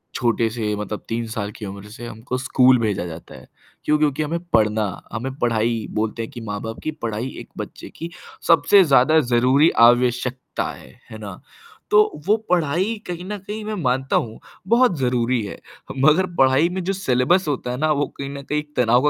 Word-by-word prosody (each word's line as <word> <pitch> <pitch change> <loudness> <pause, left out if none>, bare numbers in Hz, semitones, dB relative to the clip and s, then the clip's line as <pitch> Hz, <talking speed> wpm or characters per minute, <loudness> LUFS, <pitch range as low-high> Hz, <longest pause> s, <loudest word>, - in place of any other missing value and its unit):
छोटे 115 -2 +1
से 110 -2 -2
मतलब 105 0 -5
3 115 0 -2
साल 110 -2 -4
की 105 - -7
उम्र 100 +1 -8
से 120 +3 -9
हमको 120 +3 -5
स्कूल 130 -1 +4
भेजा 105 -6 -1
जाता 80 -4 -9
है, 65 -1 -14 0.4
क्यों? 150 - +3
क्योंकि 150 0 +1
हमें 165 +3 -2
पढ़ना 110 -1 +3 0.3
हमें 125 +4 -3
पढ़ाई 115 -1 0
बोलते 110 +1 -2
हैं 115 - -8
कि 120 - -8
माँ-बाप 110 +1 -5
की 155 - -1
पढ़ाई 115 +1 -2
एक - - -11
बच्चे - - -7
की 165 - -5 0.4
सबसे 190 +4 +6
ज़्यादा 150 0 +5
ज़रूरी 130 +3 +4 0.2
आवश्यकता 125 +1 0
है, - - -13 0.2
है 110 - -7
ना? 100 -4 -9 0.5
तो 210 -7 +3
वो 210 - +5
पढ़ाई 180 +5 +1
कहीं 175 0 -5
न 210 +2 -4
कहीं 210 +3 -6
मैं 215 - -3
मानता 130 +1 0
हूँ, 110 -1 -1 0.3
बहुत 235 -4 +4
ज़रूरी 125 -1 +1
है। 100 - -8 0.4
मगर 155 +7 +4
पढ़ाई 135 +4 +4
में 185 +1 -4
जो 195 +3 -1
सिलेबस 175 0 +2
होता 130 -4 -2
है 125 - -3
ना 155 +3 +1
वो 145 -1 +1
कहीं 140 0 -5
न - - -6
कहीं 150 +2 -1
एक 150 0 -11
तनाव 125 +1 +4
125 Hz, 190 wpm, -22 LUFS, 115-155 Hz, 0.5 s, सबसे